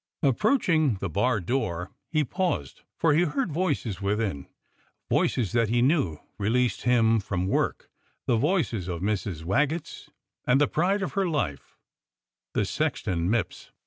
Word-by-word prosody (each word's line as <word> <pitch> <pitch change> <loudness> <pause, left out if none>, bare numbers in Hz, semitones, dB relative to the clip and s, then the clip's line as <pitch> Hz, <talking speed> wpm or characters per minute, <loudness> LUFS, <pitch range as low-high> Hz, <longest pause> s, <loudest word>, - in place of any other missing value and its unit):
Approaching 155 - +3
the 95 -2 -4
bar 120 +6 +2
door, 90 -4 -2 0.2
he 155 -2 +2
paused, 150 - -2 0.2
for 160 -2 +3
he 155 - +4
heard 175 - 0
voices 140 - -1
within, 100 -7 -1 0.6
voices 115 -7 +1
that 115 -2 +2
he 120 +1 +2
knew 130 - +2 0.2
released 120 +4 +1
him 115 -2 +4
from 95 -2 -2
work, 95 - 0 0.4
the 120 - +2
voices 120 - 0
of 85 -2 -4
Mrs. 100 -5 -2
Waggetts 150 - -1 0.4
and 125 +2 +5
the 145 - +4
pride 190 +5 +1
of 190 - -3
her 195 -2 +1
life 90 - -3 0.3
— - - -65
the - - +2
sexton 85 -1 -1
Mipps. 115 0 -2
120 Hz, 145 wpm, -26 LUFS, 100-155 Hz, 0.6 s, and